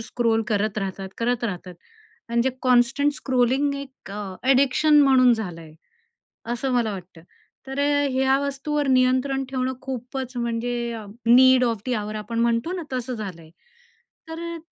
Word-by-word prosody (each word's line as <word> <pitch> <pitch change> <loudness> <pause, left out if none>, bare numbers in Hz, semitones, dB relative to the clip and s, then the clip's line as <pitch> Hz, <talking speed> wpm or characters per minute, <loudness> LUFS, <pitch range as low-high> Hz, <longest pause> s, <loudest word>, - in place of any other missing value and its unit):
Scroll 225 -1 0
करत 215 0 0
राहतात, 195 -1 -4
करत 240 +1 0
राहतात. 180 -4 -5 0.5
आणि 235 0 +1
जे 265 - +1
कॉन्स्टंट 255 +3 +3
स्क्रोलिंग 265 +1 +1
एक 275 -7 -9
अ, 200 -2 -6
अ‍ॅडिक्शन 275 +3 +4
म्हणून 260 -3 +5
झालं 185 -7 -4
आहे, 155 -1 -13 0.8
असं 260 +2 -2
मला 235 -3 +1
वाटतं. 180 -3 -10 0.4
तर 270 +1 -6
अ, 285 0 +2
ह्या 265 +1 +2
वस्तूवर 280 +1 -2
नियंत्रण 260 +1 +2
ठेवणं 260 -1 -1
खूपच 255 0 -5
म्हणजे 235 0 -2 0.4
नीड 260 0 +6
ऑफ 230 -3 -1
दी 250 - 0
ऑवर 215 0 -3
आपण 230 +2 -5
म्हणतो 235 +7 +1
ना, 365 -2 -4
तसं 255 0 -3
झालंय. 180 -8 -8 0.8
तर 325 +1 -6
अ - - -6
245 Hz, 150 wpm, -23 LUFS, 225-270 Hz, 0.8 s, नीड